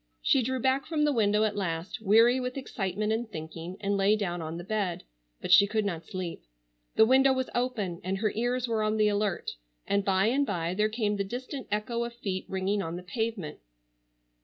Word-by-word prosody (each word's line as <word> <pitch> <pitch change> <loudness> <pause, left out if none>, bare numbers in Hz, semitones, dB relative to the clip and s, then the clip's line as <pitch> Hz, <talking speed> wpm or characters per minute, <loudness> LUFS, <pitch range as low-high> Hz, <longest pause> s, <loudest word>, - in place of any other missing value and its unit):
She 270 - +4
drew 260 +2 -1
back 265 +2 +1
from 310 -2 0
the 295 - +2
window 210 -2 +3
at 210 -1 0
last, 170 -1 -3
weary 225 +4 +5
with 250 +1 -4
excitement 210 -4 -2
and 225 +1 -2
thinking, 165 +2 -7
and 200 0 0
lay 200 +2 +4
down 175 -5 -2
on 160 +1 -5
the 175 - -6
bed, 200 -3 -2 0.4
but - - -3
she 200 +3 +8
could 215 0 0
not 170 -5 -3
sleep. 185 -2 -5 0.5
The 220 - +7
window 265 +3 +5
was 260 -1 -2
open 220 -8 -2
and 190 +2 -1
her 215 +1 0
ears 245 +2 0
were 225 -2 0
on 215 0 +1
the 210 -1 +4
alert, 205 -1 -1 0.3
and 200 0 +1
by 195 0 +2
and 265 +6 +2
by 170 -9 -2
there 210 +3 +1
came 215 -2 -1
the 200 - 0
distant 255 +6 -6
echo 225 +3 -1
of 235 0 -6
feet 190 -5 -4
ringing 190 +2 0
on 165 -2 -4
the 180 - -7
pavement. 220 -5 -3
210 Hz, 210 wpm, -28 LUFS, 190-235 Hz, 0.5 s, she